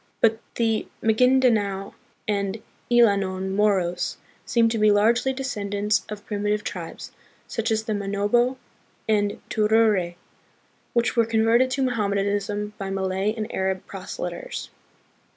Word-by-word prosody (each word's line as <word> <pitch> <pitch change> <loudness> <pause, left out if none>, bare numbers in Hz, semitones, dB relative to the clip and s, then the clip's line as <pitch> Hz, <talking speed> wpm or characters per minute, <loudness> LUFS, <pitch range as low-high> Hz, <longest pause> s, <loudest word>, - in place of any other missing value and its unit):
But 225 -1 +3 0.2
the 225 -2 0 0.2
Ma 220 - +4
gindanao 220 -6 +2 0.3
and 200 0 -1 0.3
Illanon 200 -5 +3
Moros 195 -3 +1 0.3
seem 235 -1 +3
to 225 -1 -1
be 215 0 +5
largely 225 +5 +3
descendants 210 -6 -1
of 210 -1 -7
primitive 210 0 -1
tribes, 175 -6 -6 0.4
such 225 0 -2
as 220 -1 +1
the 220 - -2
Manobo 205 +5 +1 0.5
and 205 -2 +1
Tiruray, 210 -5 +3 0.8
who 235 - +5
were 230 -1 +4
converted 230 +3 +3
to 270 +1 0
Mohammedanism 205 -2 -1
by 195 -1 -3
Malay 195 +2 -1
and 220 0 -5
Arab 190 0 -1
proselyters. 475 - -6
210 Hz, 120 wpm, -24 LUFS, 200-230 Hz, 0.8 s, be